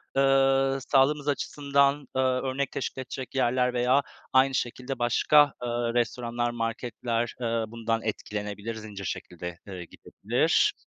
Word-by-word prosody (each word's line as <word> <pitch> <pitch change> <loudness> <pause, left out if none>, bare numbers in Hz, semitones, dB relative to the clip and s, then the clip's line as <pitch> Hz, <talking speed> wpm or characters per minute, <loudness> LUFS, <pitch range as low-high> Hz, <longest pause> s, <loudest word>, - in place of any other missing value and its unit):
eee, 135 0 +4 0.2
sağlığımız 145 +2 +3
açısından, 140 0 +1
eee, 130 - +2
örnek 130 +1 0
teşkil 130 - -4
edecek 130 +1 -7
yerler 125 -1 +2
veya 125 +3 +3 0.3
aynı 130 +1 +5
şekilde 125 +2 -3
başka, 145 +4 +4
eee, 120 - -2 0.2
restoranlar, 120 0 -1
marketler, 115 0 -2
eee, 115 -1 0
bundan 115 0 -2
etkilenebilir, 105 +1 -4
zincir 105 -3 -8
şekilde, 90 0 -6
eee, 90 -3 -7
gidebilir. - - +1
125 Hz, 120 wpm, -27 LUFS, 115-135 Hz, 0.3 s, aynı